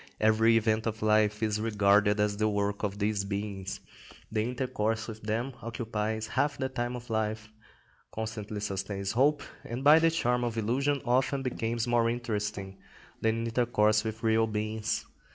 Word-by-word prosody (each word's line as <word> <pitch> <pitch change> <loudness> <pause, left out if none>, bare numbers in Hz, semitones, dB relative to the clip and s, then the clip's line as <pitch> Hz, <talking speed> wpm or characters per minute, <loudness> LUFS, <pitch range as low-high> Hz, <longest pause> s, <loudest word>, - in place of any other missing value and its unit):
Every 110 +1 +4
event 110 0 +1
of 110 -1 -3
life 105 0 +3
is 105 -1 0
regarded 105 -1 +3
as 105 0 +2
the 110 +1 +2
work 100 0 -1
of 100 -1 -2
these 105 -1 0
beings; 100 -1 -4 0.5
the 110 -1 +1
intercourse 115 -2 -1
with 110 -1 -8
them 115 +5 -2
occupies 110 -2 -3
half 145 +6 0
the 130 - -2
time 120 -1 -3
of 120 -1 -8
life, 110 0 -2 0.6
constantly 110 -1 -5
sustains 100 -1 -3
hope, 140 +5 +2 0.2
and 120 +3 -5
by 150 +3 +8
the 165 0 +4
charm 125 -7 +1
of 115 -1 -2
illusion 135 +6 0
often 130 +2 +1
becomes 115 -2 -1
more 120 -1 +2
interesting 105 -5 -3 0.4
than 115 +1 +1
intercourse 110 -2 +2
with 110 +1 -5
real 110 0 +3
beings. 110 0 -2
110 Hz, 155 wpm, -29 LUFS, 105-120 Hz, 0.6 s, by